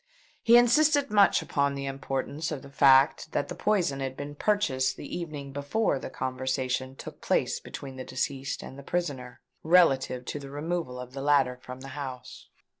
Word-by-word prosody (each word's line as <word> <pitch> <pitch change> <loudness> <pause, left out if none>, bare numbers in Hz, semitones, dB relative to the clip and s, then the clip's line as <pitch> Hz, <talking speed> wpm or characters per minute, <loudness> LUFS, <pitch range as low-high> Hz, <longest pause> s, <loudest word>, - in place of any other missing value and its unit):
He 235 +1 +7
insisted 285 +3 +4
much 205 -2 +5
upon 140 -1 0
the 140 0 -4
importance 135 +3 -3
of 150 -3 -5
the 140 - -12
fact 135 +2 +4
that - - -1
the - - -4
poison 180 -10 +1
had 135 -1 -4
been 145 +1 -6
purchased 145 -8 0
the - - -7
evening 150 -5 -6
before 145 +3 0
the - - -6
conversation 130 0 -2
took - - -10
place - - 0
between 135 -2 -9
the 130 - -5
deceased 135 +1 -3
and 135 - -9
the - - -8
prisoner, 140 -6 -4 0.2
relative 135 -7 +3
to 145 - -4
the 140 -1 -9
removal 145 -2 -3
of 125 0 -9
the 135 - -5
latter 140 -3 +3
from 125 +1 -10
the 135 - -8
house. 130 -3 -8
140 Hz, 180 wpm, -28 LUFS, 130-160 Hz, 0.2 s, He